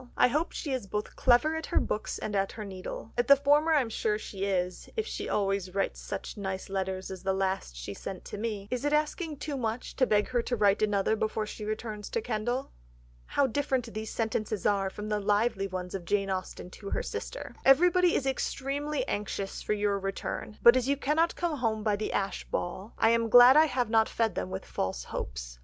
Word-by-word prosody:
I - - +5
hope 305 +7 0
she 290 - -4
is 250 -6 -3 0.3
clever 245 +4 +4
both 320 - -2
at 320 - -6
her - - +2
books 210 - -2
and 215 -1 -4
at 195 0 0
her 215 - -6
needle... 190 +3 -7
at 240 - +2
the 280 - +9
former 290 +3 +3
I 305 -3 +5
am 240 - -3
sure 215 -1 0
she 195 -2 -5
is, 180 -2 -2
if 440 - 0
she - - -4
always 195 -2 0
writes 195 - -1
such - - -6
nice 190 -1 -4
letters 190 -1 -3
as 190 -2 -7
the 190 0 0
last 190 - -1
she - - -6
sent 190 - -7
to - - -6
me. 210 -3 -3
Is 250 0 -2
it 290 0 +1
asking 305 +1 0
too 290 +1 -4
much, 230 -1 -3
to 255 - +3
beg 210 -1 +2
her 245 -1 +1
to 245 - -2
write 205 -2 +3
another 205 0 +2
before 215 0 -1
she 210 - -7
returns 215 -1 -4
to 470 - -1
Kendal?" 240 - -2 0.6
How 285 - +2
different 260 -2 -1
these 215 +1 -4
sentences 220 -2 -2
are 200 -2 +2
from 210 +2 -7
the 210 -1 +1
lively 205 0 +1
ones 180 -1 -5
of 190 -3 -5
Jane 195 +1 0
Austen 185 -1 -4
to 200 +1 -8
her - - -1
sister: - - -6
"Everybody 355 +5 +5
is 275 - 0
extremely 275 +2 -2
anxious 200 -1 -3
for - - -1
your 205 -1 0
return, 195 +2 -4
but 235 +1 +9
as 255 -1 +1
you 280 0 +2
cannot 310 +5 +1
come 340 -3 -1
home 220 -4 -1
by 210 -1 +2
the 215 - -3
Ashe 195 -1 -2
ball, 190 +5 -4
I 225 - +4
am 230 0 +2
glad 245 +3 +9
I 310 +1 +8
have 250 -5 -1
not 225 -1 +4
fed 225 -2 0
them - - -3
with 190 0 -5
false 95 -10 -3
hopes. - - -6
215 Hz, 220 wpm, -29 LUFS, 195-260 Hz, 0.6 s, the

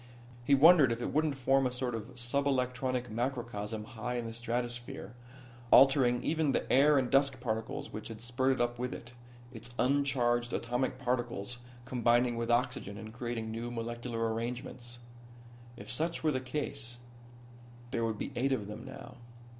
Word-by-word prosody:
He 140 +3 +5
wondered 150 -2 +7
if 115 - -1
it 120 - -3
wouldn't 155 -2 +1
form 135 +1 +3
a - - -3
sort 125 0 -2
of 115 +3 -6
sub 130 +4 0
electronic 125 -2 0
macrocosm 115 -3 -3
high 120 +1 -5
in 120 -1 -2
the 115 - -5
stratosphere, 120 0 -4 0.6
altering 130 -2 +6
even 155 -3 +1
the - - 0
air 145 +2 +6
and 130 -2 +2
dust 135 0 +3
particles 110 -2 -3
which 110 - -5
had 115 -1 -8
spurted 130 +3 0
up 120 0 0
with 125 0 -2
it, 120 +1 -11 0.4
its 115 +1 -8
uncharged 125 -3 +2
atomic 125 +2 -1
particles 120 -3 -2 0.3
combining 120 -1 +2
with 115 0 -2
hydrogen 120 -4 0
and 110 0 -8
creating 120 -2 -4
new 115 +2 -4
molecular 115 -1 -3
arrangements. 120 +1 -5 0.8
If - - -8
such 165 +1 -2
were 155 - +3
the 130 -2 -1
case 130 -2 -4 0.9
there 115 - 0
would 110 -2 -1
be - - -4
eight 135 +3 +1
of 105 -6 -1
them 105 +3 -7
now. 130 -1 -10
120 Hz, 160 wpm, -32 LUFS, 115-130 Hz, 0.9 s, wondered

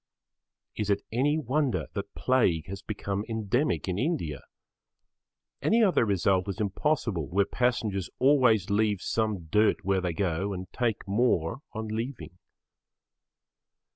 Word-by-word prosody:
Is 105 -1 -2
it 100 0 +1
any 140 +6 +2
wonder 145 -1 0
that 100 0 -5
plague 95 -12 +2
has 95 +2 -7
become 100 -1 -3
endemic 110 - 0
in 90 +1 -1
India? 125 - -1 1.2
Any 230 +1 +3
other 185 - +3
result 95 0 +1
is 95 +1 -4
impossible 105 - 0
where 100 +3 +2
passengers 110 -5 -1
always 125 -8 +4
leave 105 -1 +2
some 110 -6 -1
dirt 105 +3 +2
where 95 -1 +2
they 90 -2 -1
go 95 +2 -1
and 95 0 -5
take 115 -5 -1
more 100 -2 +1
on 110 -1 -4
leaving. 115 -4 -5
105 Hz, 130 wpm, -28 LUFS, 95-125 Hz, 1.2 s, always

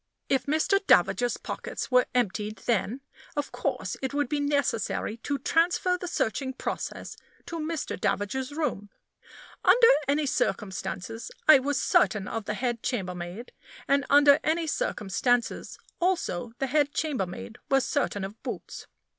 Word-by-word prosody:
If 270 0 +1
Mr. 315 +7 +2
D 195 +2 +6
's 245 - 0
pockets - - -5
were 250 -1 +5
emptied, 215 -2 0
then, 235 +2 0 0.3
of 290 -1 -2
course, - - -2
it 265 +1 -3
would 290 -3 0
be 295 - 0
necessary 280 -6 0
to 280 +5 -2
transfer 340 +6 +2
the 360 0 -5
searching 265 -4 -1
process - - -5 0.3
to 335 - -5
Mr. 315 0 -3
D 205 +4 0
's 260 +2 -7
room. 285 -10 -2 0.7
Under 475 -1 +7 0.2
any 290 +2 +2
circumstances, 210 -4 -2 0.2
I 310 -3 +9
was 280 +1 -1
certain 205 -4 +2
of 225 -2 -4
the 210 - -2
head 240 -2 -2
chambermaid; 180 -1 -4 0.4
and 280 0 +3
under 285 0 +7
any 325 +2 +1
circumstances, 245 -3 -1 0.2
also, 330 - -1
the 270 - -1
head 290 +2 +1
chambermaid 225 - -3
was 270 -1 +3
certain 255 -9 -1
of 200 +3 -7
Boots. - - -7
260 Hz, 145 wpm, -27 LUFS, 215-290 Hz, 0.7 s, I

